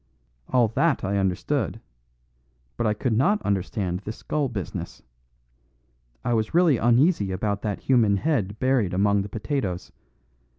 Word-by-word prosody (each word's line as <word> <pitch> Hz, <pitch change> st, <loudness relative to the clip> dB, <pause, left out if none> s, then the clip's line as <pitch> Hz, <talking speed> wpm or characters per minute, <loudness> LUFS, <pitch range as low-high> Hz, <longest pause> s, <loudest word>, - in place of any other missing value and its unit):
All 120 Hz, -2 st, +4 dB
that 155 Hz, +7 st, +1 dB
I 100 Hz, +1 st, 0 dB
understood; 95 Hz, -2 st, -1 dB, 1.0 s
but 110 Hz, -, 0 dB
I 105 Hz, -, +1 dB
could 120 Hz, +2 st, -1 dB
not 190 Hz, -, +3 dB
understand 95 Hz, -2 st, -1 dB
this 105 Hz, +3 st, -7 dB
skull 145 Hz, -3 st, -2 dB
business. 100 Hz, -8 st, -6 dB, 1.2 s
I 120 Hz, -, +1 dB
was 110 Hz, +4 st, -1 dB
really 170 Hz, -7 st, +5 dB
uneasy 120 Hz, -, +3 dB
about 100 Hz, +1 st, -2 dB
that 105 Hz, -3 st, -3 dB
human 115 Hz, -6 st, +3 dB
head 105 Hz, -7 st, -1 dB
buried 125 Hz, -8 st, +1 dB
among 100 Hz, +1 st, +3 dB
the 100 Hz, -, -6 dB
potatoes. 105 Hz, -4 st, -3 dB
110 Hz, 135 wpm, -25 LUFS, 100-130 Hz, 1.2 s, really